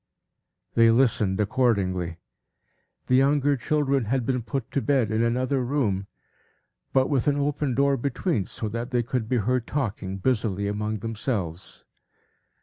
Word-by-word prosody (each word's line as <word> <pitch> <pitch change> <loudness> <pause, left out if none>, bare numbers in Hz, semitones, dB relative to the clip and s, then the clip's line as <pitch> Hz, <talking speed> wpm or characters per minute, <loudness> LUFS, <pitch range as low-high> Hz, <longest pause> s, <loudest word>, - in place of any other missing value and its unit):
They 115 0 +5
listened 115 -5 +2
accordingly. 95 -7 0 0.9
The - - -1
younger 140 +2 +4
children 140 0 0
had 125 +2 0
been 125 0 0
put 115 +2 -4
to 140 - 0
bed 130 -7 +1
in 110 +1 +1
another 125 +3 +1
room, 115 -8 -1 0.8
but 130 0 +3
with 140 -3 0
an 145 -1 +3
open 145 -2 -1
door 140 0 +3
between, 130 - -1
so 110 - -4
that 115 +3 -4
they 120 -2 +1
could 120 -2 -3
be 125 - +2
heard 120 +2 0
talking 105 -8 -3
busily 100 -3 0
among 105 +1 -2
themselves. 105 -6 -4
120 Hz, 145 wpm, -25 LUFS, 105-135 Hz, 0.9 s, They